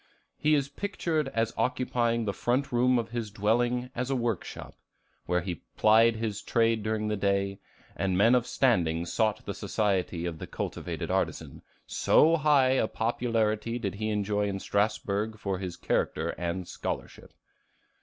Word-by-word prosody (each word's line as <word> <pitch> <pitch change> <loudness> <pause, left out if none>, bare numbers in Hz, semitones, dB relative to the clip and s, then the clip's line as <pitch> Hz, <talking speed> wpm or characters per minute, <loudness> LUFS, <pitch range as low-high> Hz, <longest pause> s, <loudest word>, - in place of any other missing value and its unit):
He 155 0 +3
is 140 -2 +1
pictured 160 -2 -2
as 115 -2 -1
occupying 120 -2 0
the 100 - -1
front 125 +7 0
room 125 +1 +3
of 115 -1 -2
his 115 -3 -3
dwelling 120 +5 0
as 125 +1 -3
a 135 - +1
work 115 -6 -1
shop, - - -9 0.5
where 90 0 +1
he 85 -2 -5 0.2
plied 115 +2 +5
his 110 -2 -3
trade 115 -1 +2
during 110 0 -1
the 105 - 0
day, 100 0 0 0.4
and 95 -2 0
men 115 +5 +5
of 125 -1 +2
standing 85 -12 +2
sought 110 +3 0
the 100 - -3
society 95 -5 -1
of 85 -2 -4
the - - -6
cultivated - - -4
artisan, - - -2 0.2
"so 165 +2 +4
high 145 -4 +4
a 130 -4 +2
popularity 115 -1 0
did 100 -6 -3
he 110 +2 -3
enjoy 105 0 0
in 100 -1 -3
Strasbourg 105 +1 -1
for 100 -4 -3
his 90 -3 -5
character 80 +1 -1
and 85 +1 -3
scholarship." - - -6
110 Hz, 160 wpm, -28 LUFS, 100-120 Hz, 0.5 s, plied